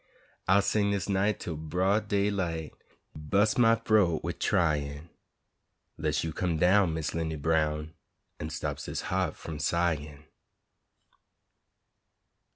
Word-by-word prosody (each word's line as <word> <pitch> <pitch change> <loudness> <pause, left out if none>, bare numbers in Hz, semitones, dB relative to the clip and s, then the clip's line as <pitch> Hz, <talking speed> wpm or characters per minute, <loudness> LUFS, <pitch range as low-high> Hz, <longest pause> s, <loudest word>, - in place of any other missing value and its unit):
I'll 95 +2 +5
sing 100 -1 +1
dis 100 -2 -1
night 100 +1 +1
twel 85 - -4
broad 95 +7 0
day 100 0 +1
light, 85 -6 -3 0.4
Ur - - -8
bu's' 100 +8 +2
my 115 -1 +6
froat 105 -8 +2
wid - - -4
tryin', 75 -1 0 0.8
'Less 75 -2 -1
you 80 -1 -3
come 85 -2 -1
down, 90 0 +4
Miss 80 -1 -3
'Lindy 80 -1 -2
Brown, 75 0 0 0.5
An' 75 - -4
stops - - -4
dis - - -4
ha't - - 0
f'um 80 -2 -7
sighin'! 75 -4 -1
85 Hz, 130 wpm, -29 LUFS, 75-100 Hz, 0.8 s, my